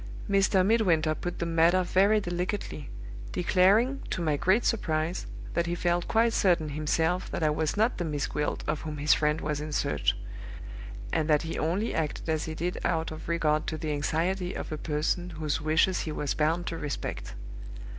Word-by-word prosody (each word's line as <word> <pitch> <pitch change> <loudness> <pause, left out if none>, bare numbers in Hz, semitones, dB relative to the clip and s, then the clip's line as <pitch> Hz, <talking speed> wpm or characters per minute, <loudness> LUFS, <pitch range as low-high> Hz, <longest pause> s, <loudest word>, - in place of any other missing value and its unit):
Mr. 195 -2 +3
Midwinter 175 -8 +3
put 175 +2 -5
the 170 - -2
matter 170 +2 +3
very 200 +4 +3
delicately, 175 -5 -4 0.4
declaring, 200 +9 +3
to - - -2
my 155 -3 +1
great 190 +10 +2
surprise, 165 -5 -1 0.3
that 170 0 0
he 175 - -1
felt 175 0 0
quite 230 +1 +3
certain 170 -5 +2
himself 160 +4 0
that - - -3
I 155 - +3
was 155 +4 -1
not 225 +4 +2
the - - 0
Miss 150 -4 -1
Gwilt 150 0 -2
of 150 0 -2
whom 155 -2 -5
his 150 +1 +4
friend 150 +1 +1
was 150 -1 -2
in 155 0 -5
search; 75 - 0 1.0
and 160 -1 0
that 150 -1 +4
he 165 - -4
only 185 +8 0
acted 155 -1 -2
as 160 0 0
he 160 - -5
did 175 +3 -2
out 160 -2 0
of 155 +1 -8
regard 155 -2 +1
to 155 - -2
the 155 -1 -3
anxiety 175 +5 -1
of - - -5
a 155 - -3
person 160 +4 -1
whose 155 -2 -2
wishes 160 +4 +2
he 155 - -3
was 145 -2 -2
bound 165 +3 0
to 165 - -4
respect. 145 -2 -5
165 Hz, 185 wpm, -28 LUFS, 155-180 Hz, 1.0 s, his